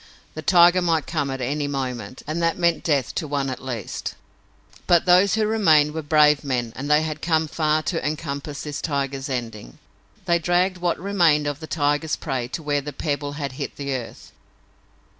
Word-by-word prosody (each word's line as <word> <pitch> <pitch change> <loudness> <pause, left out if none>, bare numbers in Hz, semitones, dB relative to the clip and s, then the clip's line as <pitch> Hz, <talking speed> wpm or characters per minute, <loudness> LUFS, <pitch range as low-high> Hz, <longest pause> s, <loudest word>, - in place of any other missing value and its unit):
The 155 - -6
tiger 175 +2 +5
might 165 -3 +1
come 145 -4 -2
at 135 0 -4
any 145 +3 -1
moment, 130 -5 -4
and 155 +3 -3
that 165 0 +1
meant 170 -2 +1
death 140 -6 0
to 160 - -3
one 140 -2 -1
at 130 - -7
least. 120 -6 -5 0.7
But 175 -2 +4
those 185 +3 +5
who 220 -1 +1
remained 160 -9 +3
were 160 - -3
brave 150 -1 +4
men 125 -5 -2
and 140 +2 -5
they 150 +1 +4
had 155 -1 -4
come 160 -1 +1
far 155 0 0
to 165 +1 -2
encompass 145 -1 -4
this 150 -1 -5
tiger's 140 -2 -2
ending. 115 - -5 0.5
They 170 -2 +2
dragged 180 +2 +1
what 175 -1 0
remained 170 -6 +2
of 145 -1 -3
the 160 - -8
tiger's 150 0 0
prey 130 -5 -3
to 155 +6 -6
where 145 -1 0
the 150 +2 -6
pebble 145 0 -3
had 145 -2 -4
hit - - -4
the 140 -1 -3
earth. 125 -3 -7
150 Hz, 190 wpm, -23 LUFS, 140-165 Hz, 0.7 s, tiger